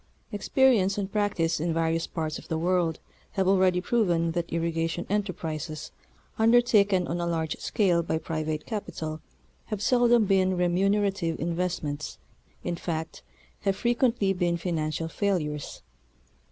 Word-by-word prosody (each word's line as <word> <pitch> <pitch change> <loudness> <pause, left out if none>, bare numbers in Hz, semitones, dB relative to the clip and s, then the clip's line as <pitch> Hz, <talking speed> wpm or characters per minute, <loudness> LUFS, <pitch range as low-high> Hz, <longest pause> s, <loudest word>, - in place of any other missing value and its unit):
Experience 210 -2 +3
and 195 -1 -3
practice 180 -6 0
in 165 +1 -1
various 165 0 0
parts 155 -2 -3
of - - -14
the 160 - -1
world 170 -1 +1 0.4
have 190 -2 +1
already 185 -2 +4
proven 180 -5 +1
that 170 0 -3
irrigation 165 0 -1
enterprises, 160 -6 -3 0.5
undertaken 220 -5 +4
on 175 +1 -2
a 170 - -1
large 160 -2 -1
scale 180 -5 +2
by 165 -1 -1
private 155 -1 -3
capital 160 -8 -5 0.4
have 215 - -4
seldom 240 0 +4
been 190 -2 +2
remunerative 190 -1 +1
invest 175 +2 -1
ments, 145 0 -4 0.5
in 175 - -2
fact, 160 -2 -4 0.4
have 195 -1 0
frequently 235 -3 +1
been 175 -2 0
financial 165 -2 -2
failures. 165 -6 -2
175 Hz, 130 wpm, -27 LUFS, 165-200 Hz, 0.5 s, already